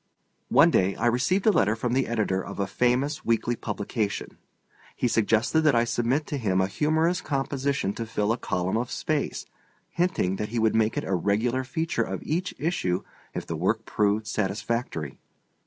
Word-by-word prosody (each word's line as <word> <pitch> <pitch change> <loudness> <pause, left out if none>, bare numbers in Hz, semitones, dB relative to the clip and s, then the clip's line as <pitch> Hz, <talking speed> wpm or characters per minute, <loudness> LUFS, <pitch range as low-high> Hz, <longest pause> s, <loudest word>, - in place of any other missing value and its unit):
One - - +6
day 95 +1 +2
I - - -2
received 130 +11 +2
a 220 - +7
letter 105 - +2
from 120 +1 -2
the 130 +1 +1
editor 105 -5 0
of - - -8
a 100 - +1
famous 125 +7 0
weekly 115 +1 +1
publication. 105 -1 -3 0.6
He 125 - 0
suggested 115 +6 +2
that 150 -4 +4
I 115 - +4
submit 120 +5 0
to 145 - -3
him 95 -6 +1
a 95 - +3
humorous 160 - +1
composition 140 - -1
to 115 +1 -5
fill 105 -1 0
a 115 - +1
column 90 +2 -1
of 120 +1 -2
space; - - -2 0.5
hinting 170 - 0
that 105 - -3
he 120 - -3
would 110 -1 +3
make 110 -1 +2
it - - 0
a 95 - -2
regular 110 +8 +1
feature 160 +6 -1
of - - -3
each 175 +4 -2
issue 120 - -1 0.3
if - - -3
the 85 - -4
work 105 +7 0
proved 105 +1 +1
satisfactory. 100 - -2
115 Hz, 180 wpm, -26 LUFS, 100-135 Hz, 0.6 s, a